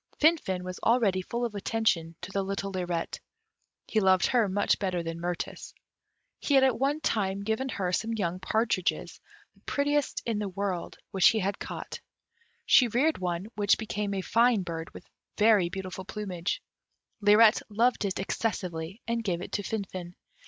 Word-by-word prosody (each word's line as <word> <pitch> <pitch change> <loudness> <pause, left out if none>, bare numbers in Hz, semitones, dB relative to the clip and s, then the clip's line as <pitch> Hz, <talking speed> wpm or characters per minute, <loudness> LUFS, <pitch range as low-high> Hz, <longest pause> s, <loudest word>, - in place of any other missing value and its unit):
Finfin 295 - +2
was 185 0 -6
already 220 -6 +2
full 235 +6 -3
of 230 - -4
attention 200 -6 0
to 175 +3 -7
the 195 - 0
little 195 0 -3
Lirette; 175 -3 -3 0.7
he 220 - +1
loved 190 -2 +4
her 235 -5 +2
much 200 +2 +1
better 185 -4 -1
than 165 0 -5
Mirtis. 175 0 -5 0.6
He 285 - +1
had 265 - +6
at 255 -4 +3
one 285 +3 +1
time 200 -7 0
given 220 +5 -1
her 190 -6 -2
some 225 +4 0
young 185 -5 -2
partridges, 215 -1 -1 0.3
the - - -27
prettiest 290 0 0
in 225 -3 -1
the 205 -2 -2
world, 190 -2 -3
which 190 -2 +6
he 225 - 0
had 195 0 -2
caught. - - -6 0.7
She 250 - +6
reared 270 +8 +1
one, 175 0 -2
which 205 -1 +3
became 210 -2 -3
a 190 - -1
fine 230 0 +3
bird, 165 -2 -5
with - - -12 0.3
very 210 -5 +4
beautiful 190 0 -6
plumage; 185 -4 -4 0.6
Lirette 210 +2 +6
loved 230 +4 +2
it 195 -2 -1
excessively, 190 -2 -3
and 230 0 -1
gave 180 -5 -1
it 180 - -7
to - - -1
Finfin. 185 -4 -5
200 Hz, 165 wpm, -28 LUFS, 185-225 Hz, 0.7 s, had